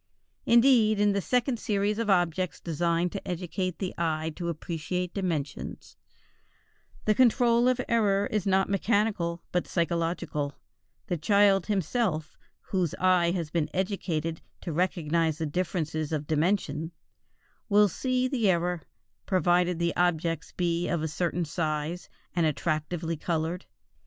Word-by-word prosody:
Indeed 235 Hz, -3 st, +5 dB
in 205 Hz, 0 st, +4 dB
the 200 Hz, 0 st, 0 dB
second 250 Hz, +2 st, 0 dB
series 205 Hz, 0 st, 0 dB
of 230 Hz, -2 st, -1 dB
objects 180 Hz, -1 st, +1 dB
designed 170 Hz, +1 st, 0 dB
to 200 Hz, -, -6 dB
educate 180 Hz, 0 st, -3 dB
the 190 Hz, -2 st, -3 dB
eye 160 Hz, -1 st, -1 dB
to 170 Hz, -1 st, -3 dB
appreciate 170 Hz, +2 st, -3 dB
dimensions, 165 Hz, -8 st, -4 dB, 1.1 s
the 215 Hz, -, +4 dB
control 240 Hz, 0 st, +4 dB
of 255 Hz, 0 st, +2 dB
error 205 Hz, -4 st, +2 dB
is 210 Hz, -2 st, 0 dB
not 190 Hz, 0 st, +3 dB
mechanical, 200 Hz, -4 st, 0 dB
but 180 Hz, -, 0 dB
psychological; 165 Hz, -4 st, -1 dB, 0.5 s
the 175 Hz, -6 st, -2 dB
child 200 Hz, +1 st, +4 dB
himself, 190 Hz, -, -1 dB, 0.3 s
whose 180 Hz, -5 st, -1 dB
eye 180 Hz, -2 st, +3 dB
has 170 Hz, -3 st, -2 dB
been 165 Hz, -2 st, 0 dB
educated 175 Hz, -4 st, -2 dB, 0.2 s
to 165 Hz, -, -4 dB
recognize 165 Hz, -2 st, +1 dB
differences 160 Hz, -1 st, -2 dB
of 150 Hz, -2 st, -2 dB
dimension, 160 Hz, +1 st, 0 dB, 0.8 s
will 205 Hz, 0 st, +6 dB
see 255 Hz, +6 st, 0 dB
the 245 Hz, -6 st, +1 dB
error, 175 Hz, -1 st, +1 dB, 0.5 s
provided 180 Hz, -2 st, +2 dB
the 170 Hz, 0 st, 0 dB
objects 165 Hz, -2 st, 0 dB
be 175 Hz, -1 st, -1 dB
of 170 Hz, -3 st, -1 dB
a -, -, 0 dB
certain 170 Hz, +2 st, -1 dB
size 155 Hz, +2 st, -3 dB, 0.3 s
and 170 Hz, -2 st, +3 dB
attractively 160 Hz, +2 st, -2 dB
colored. 165 Hz, +3 st, -2 dB
175 Hz, 130 wpm, -28 LUFS, 165-200 Hz, 1.1 s, will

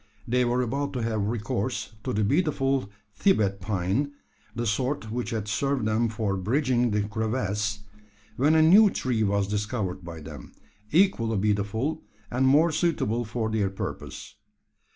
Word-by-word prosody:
They 125 Hz, +2 st, +2 dB
were 120 Hz, +1 st, +1 dB
about 140 Hz, +4 st, -2 dB
to 125 Hz, -3 st, -2 dB
have 110 Hz, -3 st, -1 dB
recourse 110 Hz, +1 st, -2 dB
to -, -, -2 dB
the 105 Hz, +1 st, +1 dB
beautiful 135 Hz, -, +1 dB, 0.2 s
Thibet 100 Hz, -, +2 dB
pine 105 Hz, +9 st, -1 dB, 0.4 s
the 120 Hz, +1 st, -2 dB
sort 120 Hz, +1 st, -1 dB
which 120 Hz, -2 st, -3 dB
had 110 Hz, -4 st, -3 dB
served 125 Hz, +4 st, 0 dB
them 110 Hz, +2 st, +1 dB
for 105 Hz, -3 st, -1 dB
bridging 125 Hz, +4 st, +1 dB
the 105 Hz, -1 st, +1 dB
crevasse 105 Hz, -1 st, -2 dB, 0.5 s
when 145 Hz, +7 st, +3 dB
a 160 Hz, -, +6 dB
new 200 Hz, +6 st, +7 dB
tree 125 Hz, -10 st, -1 dB
was 100 Hz, -1 st, +1 dB
discovered 105 Hz, -3 st, -2 dB
by 85 Hz, -1 st, -8 dB
them, 75 Hz, -4 st, -10 dB, 0.4 s
equally 145 Hz, -, +3 dB
beautiful, 105 Hz, +9 st, 0 dB, 0.3 s
and 130 Hz, +2 st, +2 dB
more 155 Hz, +5 st, +5 dB
suitable 145 Hz, -, 0 dB
for 110 Hz, 0 st, -2 dB
their 105 Hz, -3 st, +1 dB
purpose. 95 Hz, -, -7 dB
115 Hz, 150 wpm, -26 LUFS, 105-135 Hz, 0.5 s, new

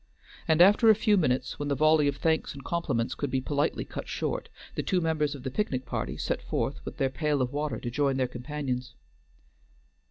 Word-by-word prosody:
And 160 Hz, +2 st, +6 dB
after 210 Hz, +4 st, +6 dB
a 220 Hz, -, +8 dB
few 210 Hz, 0 st, +3 dB
minutes, 130 Hz, -8 st, 0 dB
when 145 Hz, -, -2 dB
the 140 Hz, -, +1 dB
volley 155 Hz, 0 st, +4 dB
of 140 Hz, -, 0 dB
thanks 160 Hz, -3 st, 0 dB
and 140 Hz, -, -9 dB
compliments 135 Hz, -9 st, -1 dB
could 145 Hz, -, -3 dB
be 130 Hz, -, 0 dB
politely 145 Hz, +2 st, -1 dB
cut -, -, -7 dB
short, -, -, -3 dB, 0.2 s
the -, -, -2 dB
two 185 Hz, -, +1 dB
members 155 Hz, -3 st, 0 dB
of 135 Hz, -, -10 dB
the 130 Hz, -, -3 dB
picnic 130 Hz, -7 st, -1 dB
party -, -, -3 dB
set -, -, -2 dB
forth -, -, -2 dB
with -, -, -7 dB
their 135 Hz, -1 st, +1 dB
pail 150 Hz, +1 st, 0 dB
of 130 Hz, 0 st, -1 dB
water 145 Hz, -5 st, -2 dB
to 120 Hz, -, -4 dB
join 135 Hz, +1 st, +1 dB
their 130 Hz, -1 st, +1 dB
companions. 125 Hz, 0 st, -4 dB
145 Hz, 210 wpm, -28 LUFS, 130-160 Hz, 0.2 s, a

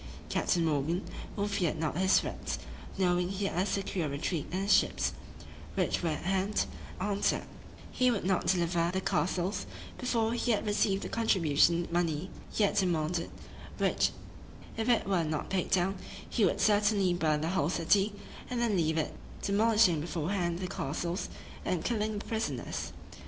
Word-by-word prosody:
Captain 170 Hz, -2 st, +1 dB
Morgan, 160 Hz, +4 st, 0 dB, 0.3 s
who 205 Hz, 0 st, 0 dB
feared 190 Hz, -6 st, 0 dB
not 155 Hz, -1 st, -1 dB
his 190 Hz, +2 st, +4 dB
threats, -, -, -4 dB, 0.4 s
knowing 180 Hz, -1 st, +2 dB
he 195 Hz, +1 st, -2 dB
had 180 Hz, -, -1 dB
a 185 Hz, -, +2 dB
secure 190 Hz, -6 st, -1 dB
retreat 145 Hz, +3 st, -2 dB
in 185 Hz, +2 st, -1 dB
his 200 Hz, 0 st, +4 dB
ships, -, -, +2 dB, 0.6 s
which -, -, +1 dB
were 170 Hz, -, 0 dB
at 155 Hz, -, -3 dB
hand, 190 Hz, +3 st, +1 dB, 0.3 s
answered, 200 Hz, +1 st, +1 dB, 0.5 s
"he 255 Hz, 0 st, +3 dB
would 230 Hz, -5 st, 0 dB
not 190 Hz, -1 st, +1 dB
deliver 170 Hz, -2 st, +2 dB
the 190 Hz, -, 0 dB
castles, 180 Hz, +2 st, 0 dB, 0.3 s
before 230 Hz, -3 st, +1 dB
he 240 Hz, 0 st, +1 dB
had 210 Hz, -, -1 dB
received 205 Hz, -1 st, +1 dB
the -, -, -3 dB
contribution 170 Hz, -6 st, +3 dB
money 170 Hz, 0 st, 0 dB, 0.2 s
he 215 Hz, -, +1 dB
had 200 Hz, -, +2 dB
demanded; 170 Hz, -3 st, +1 dB, 0.5 s
which -, -, +2 dB, 0.7 s
if 225 Hz, +2 st, -1 dB
it 240 Hz, -, +3 dB
were 185 Hz, -4 st, +2 dB
not 155 Hz, -1 st, -3 dB
paid 190 Hz, -2 st, 0 dB
down, 190 Hz, +1 st, +2 dB, 0.3 s
he 220 Hz, -, +2 dB
would -, -, +1 dB
certainly 205 Hz, -3 st, +3 dB
burn 155 Hz, -3 st, +1 dB
the 160 Hz, -, -1 dB
whole 170 Hz, -5 st, +1 dB
city, 195 Hz, +4 st, +2 dB, 0.4 s
and 250 Hz, -, -2 dB
then 235 Hz, -4 st, +2 dB
leave 160 Hz, -2 st, +1 dB
it, 155 Hz, -, -1 dB, 0.3 s
demolishing 210 Hz, -5 st, +4 dB
beforehand 170 Hz, +2 st, -1 dB
the 185 Hz, +1 st, -3 dB
castles, 170 Hz, +2 st, -3 dB, 0.3 s
and 180 Hz, -3 st, -1 dB
killing 215 Hz, -2 st, 0 dB
the 205 Hz, -, -6 dB
prisoners." 225 Hz, -1 st, -3 dB
185 Hz, 160 wpm, -31 LUFS, 170-205 Hz, 0.7 s, his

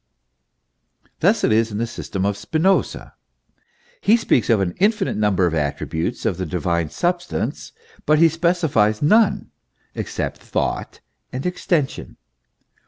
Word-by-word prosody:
Thus -, -, +2 dB
it -, -, +3 dB
is 110 Hz, +1 st, +2 dB
in 105 Hz, -, -4 dB
the 115 Hz, -, 0 dB
system 100 Hz, -5 st, -4 dB
of 100 Hz, 0 st, 0 dB
Spinoza. 160 Hz, -, 0 dB, 0.9 s
He 220 Hz, +3 st, +5 dB
speaks 125 Hz, -, +1 dB
of 115 Hz, -3 st, +4 dB
an 90 Hz, -3 st, -1 dB
infinite 210 Hz, 0 st, +1 dB
number 105 Hz, -3 st, +2 dB
of 85 Hz, -, 0 dB
attributes 80 Hz, -, -2 dB
of 100 Hz, -6 st, 0 dB
the 95 Hz, -, -3 dB
divine 85 Hz, -1 st, -1 dB
substance, 175 Hz, -, -2 dB, 0.4 s
but 155 Hz, -, +5 dB
he 165 Hz, +2 st, +6 dB
specifies 160 Hz, -11 st, +1 dB
none 215 Hz, +7 st, +3 dB, 0.4 s
except -, -, -4 dB
Thought -, -, -3 dB, 0.3 s
and 130 Hz, +1 st, -5 dB
Extension. 175 Hz, -5 st, -2 dB
115 Hz, 130 wpm, -21 LUFS, -, 0.9 s, he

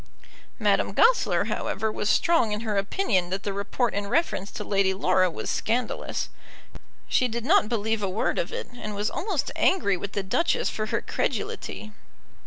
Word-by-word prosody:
Madame -, -, +2 dB
Goesler, 480 Hz, +2 st, +4 dB
however, 220 Hz, 0 st, -2 dB
was 210 Hz, -, -2 dB
strong 330 Hz, -10 st, +3 dB
in 210 Hz, +1 st, -2 dB
her 220 Hz, -2 st, -2 dB
opinion 195 Hz, -, +1 dB
that 190 Hz, +2 st, -3 dB
the 200 Hz, -, -2 dB
report 200 Hz, +4 st, -1 dB
in 200 Hz, 0 st, -2 dB
reference 200 Hz, -, 0 dB
to -, -, -6 dB
Lady 195 Hz, -1 st, +1 dB
Laura 185 Hz, -1 st, +3 dB
was 165 Hz, -, -6 dB
scandalous. 235 Hz, +1 st, -1 dB, 0.8 s
She 255 Hz, -, +2 dB
did 235 Hz, 0 st, -4 dB
not 320 Hz, -, +4 dB
believe 220 Hz, -1 st, 0 dB
a 200 Hz, -, 0 dB
word 195 Hz, -, 0 dB
of -, -, -2 dB
it, 485 Hz, +1 st, -4 dB
and 215 Hz, -4 st, -6 dB
was 205 Hz, +1 st, -1 dB
almost 375 Hz, -8 st, -2 dB
angry 200 Hz, -, +2 dB
with 200 Hz, +2 st, -6 dB
the 200 Hz, -, -1 dB
Duchess 320 Hz, -, +1 dB
for 215 Hz, 0 st, -3 dB
her -, -, -1 dB
credulity. 215 Hz, -, -3 dB
215 Hz, 175 wpm, -26 LUFS, 200-250 Hz, 0.8 s, Goesler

